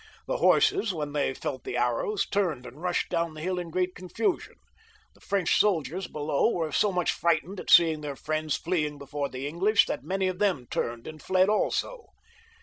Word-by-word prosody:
The - - -1
horses, 400 - +3
when 150 -2 -4
they 140 -3 0
felt 130 -3 -5
the 125 - -4
arrows, 125 - 0
turned 175 -11 -1
and 125 +5 -11
rushed 180 -1 -1
down 165 -1 -1
the 155 - -8
hill 180 +2 -1
in 175 -1 -5
great 180 +2 -1
confusion. 185 - -2 0.6
The - - -25
French 195 -4 +1
soldiers 185 -2 +1
below 150 +4 0
were 165 -8 -2
so 205 +7 +2
much 180 -2 0
Mghtened 170 +3 +1
at - - -7
seeing 160 -3 +6
their 145 -2 -5
Mends 155 -1 0
fleeing 150 -4 -1
before 140 0 -4
the 130 +1 -6
English, 200 +7 +3
that - - -4
many 190 0 -1
of 185 0 -3
them 190 -12 +1
turned 115 0 -3
and 155 -1 -9
[fled 185 +1 +3
also. 460 - -1
170 Hz, 190 wpm, -27 LUFS, 150-190 Hz, 0.6 s, seeing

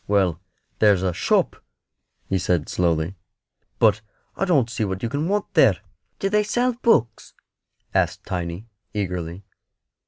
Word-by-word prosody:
"Well, 95 -5 +2 0.4
there's 100 -4 +4
a 90 -2 0
shop," 85 - +1 0.6
he 95 - 0
said, 90 -3 0
slowly; 85 +1 0 0.6
"but 110 -1 +4 0.3
I - - 0
don't 145 -10 +3
see 115 -1 -3
what 95 0 -3
you 115 - 0
can 145 +5 -1
want 205 0 -1
there." 130 - +5 0.4
"Do 195 - -1
they 210 +1 +3
sell 245 +4 +1
books?" 225 - +1 0.6
asked - - 0
Tiny, 90 +2 -4 0.3
eagerly. 90 -2 -3
100 Hz, 135 wpm, -23 LUFS, 90-150 Hz, 0.6 s, there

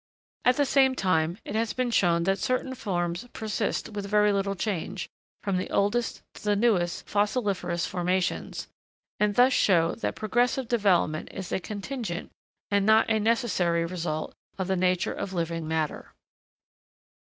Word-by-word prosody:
At 250 0 +4
the 285 - +3
same 265 -1 +4
time, 175 -4 +1
it - - -5
has 225 0 0
been 255 -1 -1
shown 170 -6 +3
that 195 +2 +1
certain 255 +3 -1
forms 175 -2 -2
persist 220 0 -2
with 205 -2 -5
very 210 0 +4
little 200 0 0
change, 190 -1 -3 0.4
from 195 -2 0
the 185 - -3
oldest 225 +4 0
to - - -13
the 210 -1 +2
newest 200 -6 +1
fossiliferous 205 -5 0
formations; 180 0 -1 0.5
and 210 -1 +2
thus 255 +2 +5
show 170 -7 +3
that - - -3
progressive 240 +4 +1
development 185 -9 +2
is 190 -2 -7
a - - 0
contingent, 205 -1 -5 0.4
and 200 -1 +3
not 220 +2 +4
a 220 - +3
necessary 205 -7 +1
result, 165 -3 -3 0.2
of 190 - -1
the 190 +1 0
nature 180 0 +1
of 190 - -5
living 165 -2 -2
matter. 160 -1 -2
200 Hz, 155 wpm, -27 LUFS, 175-225 Hz, 0.5 s, thus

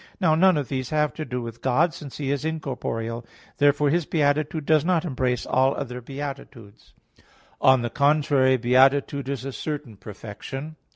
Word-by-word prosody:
Now 170 -5 +3
none 180 +1 +4
of 145 -4 -2
these 130 0 -3
have 150 -1 +1
to 155 - -5
do 125 -2 -4
with 115 0 -8
God, 150 +6 +2
since 150 -5 -9
He 140 -2 -2
is 140 -1 -2
incorporeal. 120 -7 -3 0.3
Therefore 145 0 +3
His 170 -1 0
beatitude 150 0 0
does 155 -1 +3
not 180 -1 +1
embrace 130 -5 -1
all 130 +1 +2
other 125 -2 -5
beatitudes. 120 - -9 0.7
On 130 -2 +5
the 120 - -3
contrary, 140 -3 +3
Beatitude 135 +2 +3
is 135 -1 -4
a 135 - -4
certain 145 -9 -5
perfection. 115 +9 -8
140 Hz, 165 wpm, -24 LUFS, 125-150 Hz, 0.7 s, On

